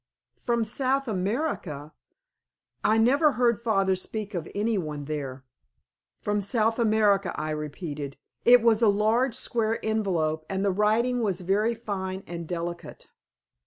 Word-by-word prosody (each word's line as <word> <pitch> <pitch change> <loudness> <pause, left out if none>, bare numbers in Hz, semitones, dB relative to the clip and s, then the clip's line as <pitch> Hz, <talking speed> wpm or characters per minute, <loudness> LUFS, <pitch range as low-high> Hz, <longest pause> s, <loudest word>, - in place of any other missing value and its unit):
"From 235 -2 0
South 265 +4 0
America! 185 - -2 0.9
I 220 - +3
never 280 +7 +4
heard 240 -2 +2
father 195 -5 +2
speak 210 +3 -5
of 170 -3 -4
any 215 +2 +1
one 150 -6 -3
there." 140 -3 -5 0.8
"From 205 0 0
South 225 +3 +1
America," 210 -4 +2
I 155 0 -2
repeated. 150 -2 -5 0.3
"It 245 -1 +7
was 230 -1 +4
a 225 - +6
large 220 +5 +2
square 230 -3 0
envelope, 175 -8 0
and 195 +1 -1
the 200 - +3
writing 220 +5 +2
was 195 -4 -1
very 210 +6 +1
fine 190 -4 -4
and 170 -1 -6
delicate." 175 0 -6
205 Hz, 135 wpm, -26 LUFS, 175-230 Hz, 0.9 s, It